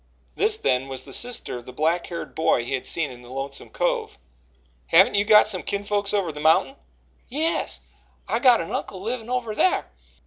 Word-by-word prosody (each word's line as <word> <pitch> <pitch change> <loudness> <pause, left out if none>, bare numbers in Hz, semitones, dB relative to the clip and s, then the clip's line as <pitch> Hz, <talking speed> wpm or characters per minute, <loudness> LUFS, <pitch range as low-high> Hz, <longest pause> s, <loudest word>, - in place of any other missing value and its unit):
This, 430 0 +2
then, 130 - 0
was 130 -1 -5
the 135 - -10
sister 240 - 0
of 120 - -12
the - - -7
black 165 +5 0
haired 170 -1 -6
boy 125 -6 +1
he 125 - -4
had 130 - -2
seen 160 -5 0
in 125 -1 -12
the 120 - -14
Lonesome 135 +1 -5
Cove. - - -2 0.7
"Haven't - - +6
you 205 0 +3
got 210 0 +6
some 195 -4 -2
kinfolks 205 0 -1
over 195 -5 0
the 150 - -9
mountain?" 160 - +3 0.5
"Yes, 315 +6 -1 0.5
I - - 0
got 250 -6 +5
an 165 - -6
uncle 190 - -4
livin' 230 +1 -4
over 245 -3 -2
thar. 365 +12 +2
185 Hz, 195 wpm, -24 LUFS, 135-230 Hz, 0.7 s, Haven't